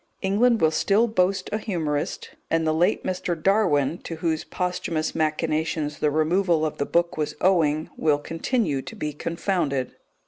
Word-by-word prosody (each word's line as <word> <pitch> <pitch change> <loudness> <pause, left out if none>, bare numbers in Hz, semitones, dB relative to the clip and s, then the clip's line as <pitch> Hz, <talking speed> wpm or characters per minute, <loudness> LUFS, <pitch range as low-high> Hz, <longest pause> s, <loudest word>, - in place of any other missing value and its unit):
England 225 +5 +3
will 160 -1 +4
still 200 +7 +3
boast 195 -2 +1
a 215 - 0
humorist; 160 -9 -3 0.2
and 165 0 +1
the 155 - +2
late 175 +6 +2
Mr. 180 -2 -2
Darwin 160 -6 +2
(to 165 - -6
whose 160 -1 -1
posthumous 180 -3 -2
machinations 155 -1 -1
the 150 - +2
removal 160 +2 +2
of 155 - -4
the 140 - -1
book 170 -1 +1
was 150 -1 -2
owing) 160 -4 +2
will 150 -2 +2
continue 165 - -1
to 225 - -9
be 150 -8 -4
confounded. 165 -4 -1
165 Hz, 160 wpm, -24 LUFS, 155-185 Hz, 0.2 s, will